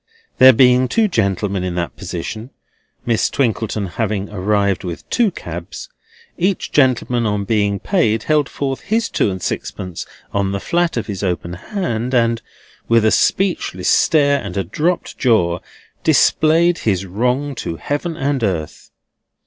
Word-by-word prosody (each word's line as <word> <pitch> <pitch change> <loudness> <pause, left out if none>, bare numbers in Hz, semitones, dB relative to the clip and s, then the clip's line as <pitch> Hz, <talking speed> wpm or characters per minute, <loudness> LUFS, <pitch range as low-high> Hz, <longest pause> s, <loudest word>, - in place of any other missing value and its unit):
There 130 0 +10
being 125 +1 +4
two 220 - +2
gentlemen 100 - -1
in 90 -1 -3
that 85 -1 -3
position 100 +5 -6 0.6
(Miss 115 -2 +1
Twinkleton 110 -5 -1
having 100 +1 -3
arrived 100 -1 0
with 85 -2 -6
two 235 -3 +3
cabs), - - -8 0.5
each 185 +2 0
gentleman 125 -4 +2
on 105 -1 -1
being 100 -1 +1
paid 115 - +1
held 150 -2 +1
forth 135 -2 -3
his 220 +2 0
two - - +1
and 95 -1 -4
sixpence 90 -1 -5 0.3
on 100 -1 0
the 100 - -2
flat 170 - 0
of 115 - -1
his 100 -3 -5
open 90 -2 -2
hand, 125 - -3
and, 115 -1 +2 0.5
with 115 -1 +3
a 110 - +4
speechless 175 - +1
stare 140 -3 +3
and 100 -1 -6
a 95 - +1
dropped 160 - -2
jaw, 90 -9 +2 0.4
displayed 165 +2 +3
his 95 -3 0
wrong 125 +9 -1
to 85 -9 -5
heaven 145 - -3
and 135 -2 -1
earth. 85 -7 -3
115 Hz, 150 wpm, -18 LUFS, 100-140 Hz, 0.6 s, There